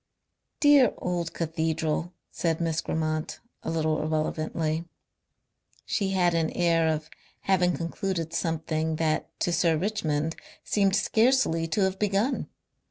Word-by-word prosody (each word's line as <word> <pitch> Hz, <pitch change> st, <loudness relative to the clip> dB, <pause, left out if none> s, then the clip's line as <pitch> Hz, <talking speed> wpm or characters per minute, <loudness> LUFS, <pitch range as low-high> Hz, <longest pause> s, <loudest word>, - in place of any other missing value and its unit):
"Dear 290 Hz, -6 st, +6 dB
old 175 Hz, -2 st, -2 dB
cathedral," 160 Hz, 0 st, -1 dB, 0.2 s
said 165 Hz, -2 st, -1 dB
Miss 165 Hz, -2 st, 0 dB
Grammont, 155 Hz, -1 st, -2 dB, 0.2 s
a -, -, -4 dB
little 155 Hz, -2 st, 0 dB
irrelevantly. 155 Hz, +1 st, -1 dB, 1.0 s
She 195 Hz, -3 st, 0 dB
had 180 Hz, -2 st, +2 dB
an 165 Hz, -1 st, +1 dB
air 165 Hz, -2 st, +2 dB
of 155 Hz, -1 st, -1 dB, 0.3 s
having 180 Hz, -2 st, +2 dB
concluded 170 Hz, -1 st, -3 dB
something 160 Hz, -1 st, -1 dB
that 155 Hz, -1 st, 0 dB
to 175 Hz, -, +1 dB
Sir 160 Hz, -1 st, +3 dB
Richmond 160 Hz, -5 st, -1 dB, 0.3 s
seemed 195 Hz, -2 st, +2 dB
scarcely 220 Hz, -7 st, +2 dB
to 165 Hz, +6 st, 0 dB
have 190 Hz, 0 st, +1 dB
begun. 210 Hz, +5 st, 0 dB
165 Hz, 120 wpm, -27 LUFS, 160-190 Hz, 1.0 s, Dear